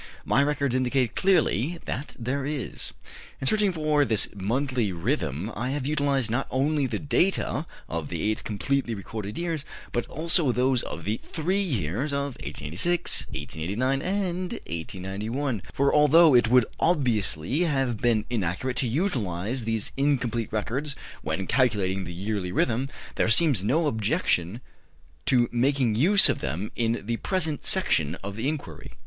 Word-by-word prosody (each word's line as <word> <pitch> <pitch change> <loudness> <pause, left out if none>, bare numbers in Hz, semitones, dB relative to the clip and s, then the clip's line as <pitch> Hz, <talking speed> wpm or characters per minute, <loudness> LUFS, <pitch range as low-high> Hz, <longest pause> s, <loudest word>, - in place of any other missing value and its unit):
My 135 - +3
records 140 -2 +1
indicate 130 -1 +1
clearly 170 - +2
that 140 - -4
there 130 +4 -2
is. 140 -3 -4 0.5
In - - -4
searching 210 +5 +3
for 155 -3 +2
this 110 -6 +1
monthly 120 +2 0
rhythm 85 - -2
I 120 +3 -2
have 140 -1 -2
utilized 140 -5 +1
not 125 +4 0
only 140 +1 +1
the - - -2
data 160 -1 0 0.2
of 80 -2 -4
the 85 -3 -3
eight 110 +1 0
completely 120 +3 -1
recorded 105 +1 -6
years, 165 -4 -2 0.3
but 120 - -1
also 160 -2 +2
those 125 +1 +2
of 85 - -6
the 105 +3 0
three 180 +5 -1
years 130 - -1
of 140 -1 -1
1886, 85 - -1
1889, 115 +12 -2
and 185 -1 -1
1891, 100 - -3
for, 140 +1 +2
although 150 +1 +6
it 120 -2 +5
would 125 0 +5
obviously 120 - +1
have 135 -9 +1
been 115 -3 +2
inaccurate 115 +3 -2
to 130 - +1
utilize 115 - -1
these 110 -2 -1
incomplete 125 -5 0
records 130 +7 -2 0.3
when 80 +5 -2
calculating 95 -8 +1
the 85 - -6
yearly 95 +1 -3
rhythm, 125 +7 +1 0.3
there - - +2
seems 120 - +4
no 155 +10 +2
objection 110 - 0 0.7
to 120 -2 +4
making 125 -1 +2
use 185 - +6
of - - 0
them 95 - -3
in 115 -1 0
the 115 +1 -1
present 160 -3 -1
section 85 - +2
of 100 0 -5
the 115 +5 -2
inquiry. 145 - -6
125 Hz, 150 wpm, -26 LUFS, 105-145 Hz, 0.7 s, although